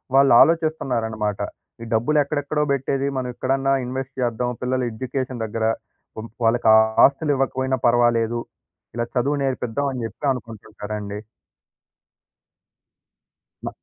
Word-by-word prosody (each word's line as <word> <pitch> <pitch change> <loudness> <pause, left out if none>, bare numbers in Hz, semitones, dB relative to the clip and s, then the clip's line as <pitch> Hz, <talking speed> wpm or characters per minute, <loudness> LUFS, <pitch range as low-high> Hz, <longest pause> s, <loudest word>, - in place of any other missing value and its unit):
వాళ్ళ 140 0 +6
ఆలోచిస్తన్నారనమాట. 120 - +1 0.4
ఈ - - -6
డబ్బులెక్కడెక్కడో 145 +4 +1
పెట్టేది 135 0 -1
మనం 125 -1 -2
ఇక్కడన్నా 135 +2 0
ఇన్వెస్ట్ 130 +1 -5
చేద్దాం. 120 +1 -1
పిల్లల 130 +1 0
ఎడ్యుకేషన్ 130 +1 -4
దెగ్గర. 110 +1 -2 0.5
హ్మ్. 115 +1 -7 0.2
వాళ్ళకి 115 0 +3 0.4
ఆస్తులివ్వకపోయినా 135 -2 0
పర్వాలేదు. 120 -1 +2 0.6
ఇలా 120 0 -1
చదువునేరర్పిపిద్దాం 135 -1 -1
అని 125 -2 -4
చెప్పి 130 - -18
అనుకుంటుంటారండి. 105 -3 -7 2.4
బ - - -3
125 Hz, 95 wpm, -22 LUFS, 115-135 Hz, 2.4 s, వాళ్ళ